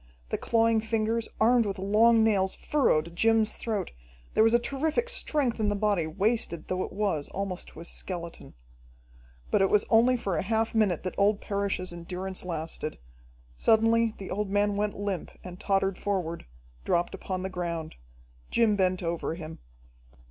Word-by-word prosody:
The -, -, -1 dB
clawing 230 Hz, -1 st, +3 dB
fingers, 225 Hz, +1 st, -1 dB
armed 230 Hz, 0 st, +4 dB
with 195 Hz, -, -3 dB
long 220 Hz, +4 st, +4 dB
nails, 195 Hz, -4 st, +2 dB
furrowed 170 Hz, -, +1 dB
Jim's 220 Hz, +2 st, +3 dB
throat, 215 Hz, -4 st, -3 dB, 0.4 s
there -, -, +5 dB
was 225 Hz, +1 st, +4 dB
a -, -, +8 dB
terrific 305 Hz, -, -1 dB
strength 295 Hz, -, 0 dB
in 210 Hz, -1 st, +2 dB
the 205 Hz, -, 0 dB
body, 200 Hz, -5 st, +1 dB
wasted 195 Hz, -1 st, -1 dB
though 185 Hz, 0 st, -1 dB
it -, -, -6 dB
was 190 Hz, -8 st, -1 dB
almost 195 Hz, -2 st, -4 dB
to 160 Hz, -, -11 dB
a -, -, -9 dB
skeleton. 170 Hz, -, -6 dB, 1.0 s
But -, -, +3 dB
it 195 Hz, -, +4 dB
was 210 Hz, -, +3 dB
only 240 Hz, +3 st, +5 dB
for 195 Hz, -7 st, -2 dB
a -, -, +1 dB
half 220 Hz, +3 st, 0 dB
minute 210 Hz, -7 st, +2 dB
that 185 Hz, -, -3 dB
old 200 Hz, +1 st, +3 dB
Parrish's 200 Hz, -3 st, -2 dB
endurance 180 Hz, +2 st, -5 dB
lasted. 160 Hz, -3 st, -4 dB, 0.6 s
Suddenly 225 Hz, -, +3 dB
the 195 Hz, -, -8 dB
old 205 Hz, 0 st, -2 dB
man 205 Hz, +1 st, +1 dB
went 210 Hz, 0 st, -1 dB
limp 200 Hz, -3 st, -3 dB
and 180 Hz, 0 st, -9 dB
tottered 195 Hz, -1 st, 0 dB
forward, 180 Hz, -, -2 dB, 0.4 s
dropped 170 Hz, -, 0 dB
upon 185 Hz, -1 st, -4 dB
the 190 Hz, -, -2 dB
ground. 170 Hz, -3 st, -4 dB, 0.6 s
Jim 225 Hz, -3 st, +3 dB
bent 185 Hz, -2 st, +1 dB
over 165 Hz, -1 st, -2 dB
him. 160 Hz, -1 st, -8 dB
200 Hz, 165 wpm, -28 LUFS, 180-225 Hz, 1.0 s, a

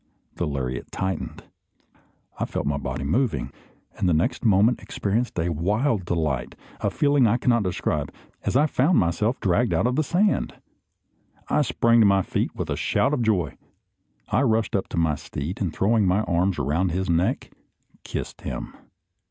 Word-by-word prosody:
The 85 Hz, -, -1 dB
lariat 65 Hz, -4 st, -4 dB
tightened, 95 Hz, 0 st, -3 dB, 1.0 s
I -, -, 0 dB
felt -, -, -3 dB
my 70 Hz, -1 st, 0 dB
body 65 Hz, 0 st, -4 dB
moving, 80 Hz, -, 0 dB, 0.4 s
and 90 Hz, -, 0 dB
the 85 Hz, -, +3 dB
next 80 Hz, -, 0 dB
moment 110 Hz, +2 st, +4 dB
experienced 110 Hz, +3 st, -2 dB
a 85 Hz, +1 st, 0 dB
wild 100 Hz, -, 0 dB
delight, 75 Hz, -8 st, -1 dB, 0.2 s
a -, -, 0 dB
feeling 145 Hz, -4 st, +3 dB
I 115 Hz, +3 st, +3 dB
cannot 120 Hz, -2 st, +2 dB
describe, 90 Hz, -3 st, -2 dB, 0.3 s
as -, -, -2 dB
I 145 Hz, +3 st, +5 dB
found 155 Hz, +3 st, +2 dB
myself 105 Hz, +8 st, +1 dB
dragged 105 Hz, +4 st, +1 dB
out -, -, +1 dB
of 125 Hz, +1 st, +1 dB
the 155 Hz, -, +2 dB
sand! 195 Hz, +7 st, +1 dB, 0.9 s
I -, -, +3 dB
sprang 115 Hz, 0 st, +3 dB
to 110 Hz, -, +6 dB
my 100 Hz, -1 st, +3 dB
feet -, -, -2 dB
with -, -, -4 dB
a -, -, 0 dB
shout 140 Hz, -, +1 dB
of 130 Hz, -, 0 dB
joy. 95 Hz, -, 0 dB, 0.7 s
I 115 Hz, -, +1 dB
rushed 115 Hz, -6 st, +1 dB
up 95 Hz, -, 0 dB
to -, -, -6 dB
my 80 Hz, -2 st, +2 dB
steed, 75 Hz, +3 st, -5 dB
and 90 Hz, -5 st, 0 dB
throwing 105 Hz, +3 st, +2 dB
my 95 Hz, +4 st, +3 dB
arms 90 Hz, -1 st, 0 dB
around 75 Hz, +6 st, 0 dB
his 95 Hz, +2 st, -1 dB
neck, 85 Hz, +1 st, 0 dB, 0.5 s
kissed -, -, -5 dB
him. -, -, -5 dB
95 Hz, 170 wpm, -24 LUFS, 85-115 Hz, 1.0 s, to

